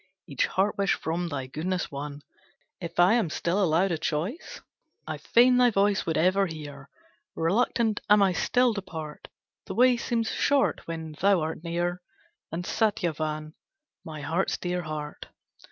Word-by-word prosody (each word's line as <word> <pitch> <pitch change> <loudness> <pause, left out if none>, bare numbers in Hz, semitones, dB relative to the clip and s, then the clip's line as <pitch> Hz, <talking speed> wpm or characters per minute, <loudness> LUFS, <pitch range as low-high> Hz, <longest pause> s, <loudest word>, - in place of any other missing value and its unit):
"Each - - 0
heart 200 +2 0
wish 200 -1 +2
from 170 +2 -2
thy 140 -5 -4
goodness 175 +7 -3
won, 145 +1 -6 0.6
If 170 -1 -6
I 180 +4 +6
am 230 -8 +2
still 175 +5 0
allowed 175 +3 +2
a 165 - -1
choice, 170 - -3 0.5
I - - -5
fain 245 +1 +4
thy 250 0 +6
voice 200 -3 +1
would 160 - 0
ever 190 +4 +3
hear, 145 -4 -9 0.5
Reluctant 215 +5 +1
am 210 -1 +6
I 190 -2 +3
still 245 +7 +2
to 200 - -3
part, 160 -5 -8 0.4
The - - -5
way 250 0 +5
seems 230 -1 -1
short 285 -1 +1
when 160 -1 -5
thou 195 -3 +4
art 160 +1 -4
near 175 +1 -2 0.5
And 170 +2 -4
Satyavan, 155 -8 -1 0.5
my 155 -2 -7
heart's 165 +6 -1
dear 180 0 -2
heart. 150 -2 -6
175 Hz, 155 wpm, -27 LUFS, 155-205 Hz, 0.6 s, I